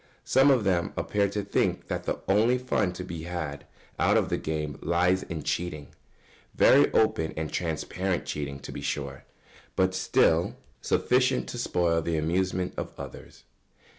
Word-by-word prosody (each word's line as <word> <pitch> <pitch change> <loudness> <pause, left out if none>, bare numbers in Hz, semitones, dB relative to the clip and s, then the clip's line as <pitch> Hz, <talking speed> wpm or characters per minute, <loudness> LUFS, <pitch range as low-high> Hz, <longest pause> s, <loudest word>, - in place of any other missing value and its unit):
Some 135 +2 +5
of 130 -5 +4
them 90 -3 +1
appear 100 -1 +1
to 105 +1 -3
think 100 - 0
that - - -3
the - - -2
only 110 +6 +4
fun 115 -7 0
to 90 - -6
be 85 -2 -6
had 80 -5 -5 0.3
out - - +4
of - - +1
the - - 0
game 75 -2 -3
lies 90 +2 +2
in 80 -3 -6
cheating 75 -5 -3 0.6
very 140 +2 +6
open 80 -7 +1
and 80 -1 -3
transparent 90 +2 -2
cheating, 70 -2 -4
to - - -8
be - - -6
sure 70 -2 -4 0.5
but 95 0 +2
still 85 -2 +2 0.3
sufficient 125 +1 +2
to 120 - -5
spoil 85 -7 +1
the 80 0 -1
amusement 90 +3 0
of - - -6
others. - - -10
90 Hz, 160 wpm, -27 LUFS, 80-100 Hz, 0.6 s, very